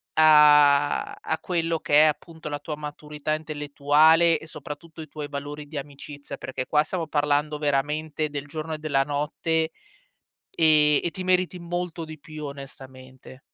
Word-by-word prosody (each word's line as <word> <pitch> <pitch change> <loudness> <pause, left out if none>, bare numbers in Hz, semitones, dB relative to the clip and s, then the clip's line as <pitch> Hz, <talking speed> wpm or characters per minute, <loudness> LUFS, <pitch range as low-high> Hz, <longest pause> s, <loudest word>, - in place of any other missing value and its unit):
a 150 -2 +5
a 160 - -4
quello 165 -2 -1
che 150 0 +4
è - - +6
appunto 160 +1 -3
la 145 0 -4
tua 150 +1 -5
maturità 150 0 -5
intellettuale 155 +2 +3
e - - -12
soprattutto 155 +1 -9
i 155 - -9
tuoi 150 0 -7
valori 145 +1 -6
di 155 - -12
amicizia, 140 0 -8
perché 130 -1 -5
qua 150 0 +3
stiamo 170 -2 -4
parlando 150 0 0
veramente 150 +2 -1
del 145 -1 -5
giorno 155 +2 -5
e - - -3
della 150 -3 0
notte, 155 +3 -1 0.8
ehm, 150 -2 +4
e 170 - -1
ti 185 - -5
meriti 185 0 +1
molto 175 -1 -4
di 155 -1 -9
più 155 +1 -10
onestamente. 130 -2 -11
150 Hz, 155 wpm, -25 LUFS, 145-160 Hz, 0.8 s, è